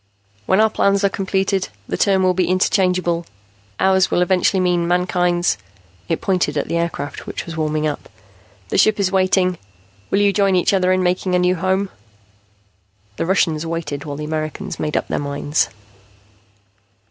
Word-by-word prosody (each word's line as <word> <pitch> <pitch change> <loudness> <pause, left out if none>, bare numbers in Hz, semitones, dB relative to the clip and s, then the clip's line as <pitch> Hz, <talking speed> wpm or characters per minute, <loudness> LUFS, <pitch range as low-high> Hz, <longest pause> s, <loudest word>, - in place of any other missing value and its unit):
"When 190 - +3
our 220 0 +5
plans 200 0 +2
are 200 - +4
completed, 195 0 -1 0.2
the - - -2
term 190 -2 +2
will 185 0 +3
be 180 -1 0
interchangeable. 180 -2 +1 0.5
'Ours' 190 0 +3
will 175 - +2
eventually 190 +3 +2
mean 175 -2 +1
mankind's." 180 0 +1 0.5
It - - -1
pointed 180 -6 0
at 145 - -1
the - - -2
aircraft, 170 -4 -3
which - - -5
was 170 - -7
warming 155 -1 -1
up. 150 -1 -4 0.6
"The - - +1
ship 215 -1 +4
is 190 -2 +1
waiting. 185 -2 +2 0.5
Will - - +1
you 200 -1 +3
join 195 -1 +2
each 180 +2 +2
other 185 -1 +2
in 185 0 +2
making 180 +1 0
a - - +4
new 180 0 +2
home?" 190 +2 0 1.3
The - - -2
Russians 165 -4 +1
waited 160 -4 -4
while 145 -2 -6
the 150 - -5
Americans 155 0 -4
made 150 -1 -1
up - - -2
their - - -2
minds. 145 +1 -1
180 Hz, 170 wpm, -19 LUFS, 165-190 Hz, 1.3 s, our